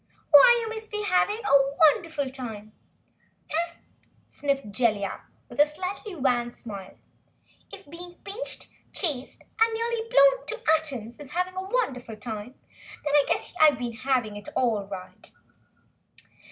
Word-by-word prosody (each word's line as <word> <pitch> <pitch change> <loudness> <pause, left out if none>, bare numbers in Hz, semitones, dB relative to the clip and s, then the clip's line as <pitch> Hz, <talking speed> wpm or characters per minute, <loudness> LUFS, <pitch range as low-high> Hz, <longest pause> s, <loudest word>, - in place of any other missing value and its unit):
Why, 480 - +9
you 450 - -4
must 440 0 -7
be 420 0 -3
having 410 +2 +2
a 275 -4 +4
wonderful 315 -2 +3
time!" 220 -5 -7 0.8
"Humph!" 335 +2 -1 0.5
sniffed 275 -7 -2
Jellia, 210 -3 0 0.2
with - - -12
a 295 - +8
slightly 370 +5 -5
wan 245 -5 +1
smile. 200 -6 -9 0.7
"If 395 -4 -11
being 350 +3 -10
pinched, 415 +5 -6 0.2
chased 280 -8 -2 0.2
and 450 0 +5
nearly 460 0 -2
blown - - +5
to 465 +2 -4 0.2
atoms 260 -7 -5
is 290 0 -10
having 365 +1 -1
a 375 - -2
wonderful 255 - -1
time, 215 +3 -7 0.5
then 290 - -1
I 290 -1 +5
guess - - -1
I've 300 -4 +7
been 240 -1 -4
having 250 -3 -1
it 205 - -9
all 220 -6 +1
right!" 190 -2 -9
290 Hz, 140 wpm, -26 LUFS, 240-375 Hz, 0.8 s, Why